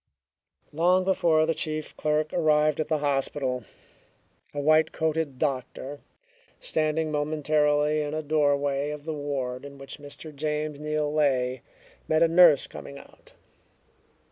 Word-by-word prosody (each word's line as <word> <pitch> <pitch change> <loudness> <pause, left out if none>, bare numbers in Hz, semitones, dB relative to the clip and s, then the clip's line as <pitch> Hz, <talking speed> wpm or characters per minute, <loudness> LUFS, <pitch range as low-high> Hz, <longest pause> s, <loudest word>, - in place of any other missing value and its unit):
Long 180 +4 +3
before 170 -4 +3
the 165 - +1
chief 155 -1 -3
clerk 155 0 0
arrived 155 -2 +2
at 155 - -1
the 155 0 +1
hospital, 135 -3 -1 0.9
a 145 - -5
white 155 +2 +3
coated 160 -4 -1
doctor, 135 0 -3 0.6
standing 155 0 -1
momentarily 150 0 +1
in 150 0 -3
a 155 - -3
doorway 145 -1 +1
of 150 0 -7
the 160 - -3
ward 140 -4 -4
in 140 0 -10
which 135 +2 -9
Mr. 145 +1 -10
James 150 0 -3
Neal 150 0 -1
lay, 130 -4 +1 0.5
met 155 +1 +3
a - - +5
nurse 165 -4 +6
coming 140 - -10
out. - - -17
150 Hz, 135 wpm, -26 LUFS, 145-155 Hz, 0.9 s, nurse